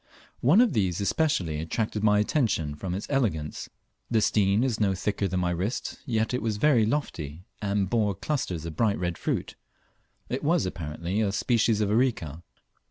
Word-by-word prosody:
One 160 - +5
of 245 -4 +3
these 95 -7 +1
especially 100 - 0
attracted 105 +6 -2
my 105 -1 +5
attention 105 - +1
from 90 +4 -4
its 100 - -4
elegance. 100 - -1 0.4
The 115 - +3
stein 100 0 +3
was 125 -4 0
not 100 -3 +1
thicker 100 +1 -1
than 90 0 -1
my 90 -1 +1
wrist, 95 +8 -3
yet 110 0 0
it 125 - 0
was 110 -2 -1
very 120 -3 +4
lofty, 90 - -3 0.2
and 100 -1 0
bore 105 -2 +1
clusters 90 - -2
of 80 -2 -6
bright 105 +2 +2
red 90 -1 -2
fruit. - - -2 0.7
It 130 - -3
was 165 - +2
apparently 85 +3 -3
a 100 -3 +1
species 110 +1 +2
of 105 -1 +1
Areca. 105 - 0
105 Hz, 170 wpm, -27 LUFS, 90-115 Hz, 0.7 s, One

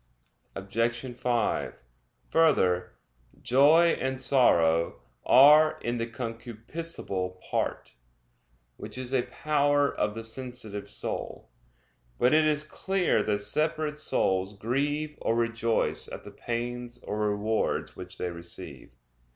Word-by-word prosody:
Obj. 115 +5 -2
5: 120 -1 -1 0.5
Further, 90 - +2 0.5
joy 145 +7 +5
and 130 0 -2
sorrow 85 -12 +3 0.3
are 150 +4 +7
in 120 +1 -2
the 115 0 -2
concupiscible 115 - -4
part, - - -2 0.8
which - - -7
is 130 0 -3
a 130 - +3
power 145 0 +1
of 105 - -1
the 115 - -6
sensitive 115 -4 -7
soul. 100 - -5 0.7
But 125 - +3
it 155 0 +5
is 150 -1 +1
clear 190 +4 0
that 105 -1 0
separate 150 +6 -1
souls 95 -8 0
grieve 145 +7 -2
or 115 - +1
rejoice 115 -1 0
at - - -8
the - - -10
pains 120 0 -4
or 105 0 -1
rewards 105 +2 -1
which 90 +1 -9
they 90 - -3
receive. 85 0 -8
120 Hz, 115 wpm, -28 LUFS, 105-145 Hz, 0.8 s, are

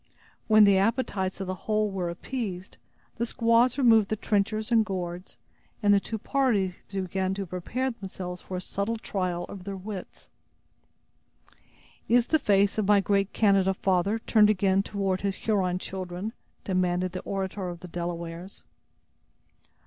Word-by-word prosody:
When 215 -1 +7
the 200 -2 +6
appetites 200 -4 0
of 195 - -3
the 185 - -3 0.2
whole 215 -1 +2
were 185 -3 -2
appeased, 190 0 -5 0.4
the 235 - 0
squaws 230 +2 +3
removed 225 -6 +5
the 215 - 0
trenchers 215 +2 -1
and 225 -1 +5
gourds, 180 -2 -5 0.5
and 205 0 +5
the 200 - +5
two 220 +3 -4
parties 215 -7 +1 0.2
began 190 0 -2
to 200 0 -3
prepare 220 +9 -3
themselves 185 -4 -7
for 185 - -6
a - - -4
subtle 200 +5 -2
trial 180 -5 -2
of 195 -3 -9
their 195 0 -5
wits. 190 0 -8 1.8
"Is 240 0 +5
the 315 - +2
face 200 -3 +2
of 205 - 0
my 205 -1 +6
great 200 0 +1
Canada 195 -3 +3
father 190 +3 +1
turned 215 -1 +4
again 195 -2 +3
toward 195 -2 -2
his 195 -1 -1
Huron 190 -5 0
children?" 185 +3 -5 0.3
demanded 185 -1 0
the 185 - -4
orator 190 -1 -3
of 175 -1 -8
the 180 - -8
Delawares. 170 +1 -6
195 Hz, 150 wpm, -27 LUFS, 185-215 Hz, 1.8 s, When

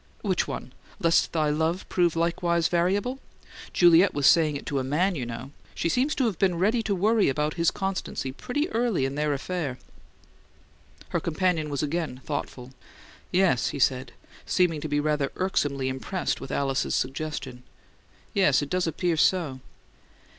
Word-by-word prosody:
"Which - - 0
one? - - -6 0.3
'Lest 165 0 +3
thy 155 -2 +1
love 160 +4 -1
prove 175 -3 +1
likewise 170 0 +1
variable'? 195 +9 0 0.5
Juliet 175 +2 +5
was 145 -1 0
saying 155 -2 +5
it 140 - -6
to 140 - -1
a - - -2
MAN, 165 +9 +1
you 130 -8 -4
know. 120 +3 -7 0.2
She 170 - -1
seems 260 - +1
to 265 - +1
have 215 -7 -1
been 185 -3 +2
ready 215 +7 +2
to 215 -3 -1
worry 215 +1 +3
about 150 +3 0
his 170 -1 +2
constancy 190 -8 -3
pretty 270 - -2
early 225 - +1
in 135 - -2
their 150 +1 0
affair!" 145 -2 -3 1.3
Her - - 0
companion 170 -2 0
was 140 -1 -2
again 150 -3 -2
thoughtful. 130 -3 -5 0.6
"Yes," 180 -9 +3
he - - -5
said, 130 -1 +1 0.3
seeming 170 -5 +1
to 155 - -4
be 145 0 +1
rather 150 -2 0
irksomely 145 -8 0
impressed 130 +8 -2
with - - -7
Alice's 135 -1 0
suggestion. 135 -2 -3 0.7
"Yes; 170 -8 +3
it 145 - -7
does 180 -1 +1
appear 165 +1 0
so." 155 -6 +2
160 Hz, 160 wpm, -26 LUFS, 140-185 Hz, 1.3 s, Juliet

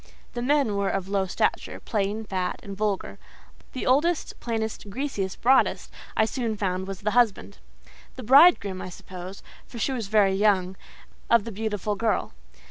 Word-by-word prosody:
The 240 - -4
men 270 -4 +2
were 200 -1 0
of 195 -1 -3
low 195 -1 0
stature, - - -1
plain, 210 0 -2
fat, 185 -3 -3
and 200 -1 -7
vulgar; 205 -1 -2 0.5
the 255 - -4
oldest, 300 +6 +1
plainest, 220 -3 -4
greasiest, 200 -5 -3
broadest, 260 +2 +3 0.3
I 220 - +4
soon 225 -2 -3
found 190 -1 -2
was 195 -2 -6
the 210 +1 0
husband—the 235 +2 -3
bridegroom 250 - +5
I - - -6
suppose, 185 +1 -10 0.2
for 240 - -10
she 250 - 0
was 235 -6 -3
very 200 -2 +3
young—of 195 +3 0
the 230 - -6
beautiful 210 -1 -2
girl. 220 - -1
210 Hz, 150 wpm, -25 LUFS, 195-235 Hz, 0.5 s, bridegroom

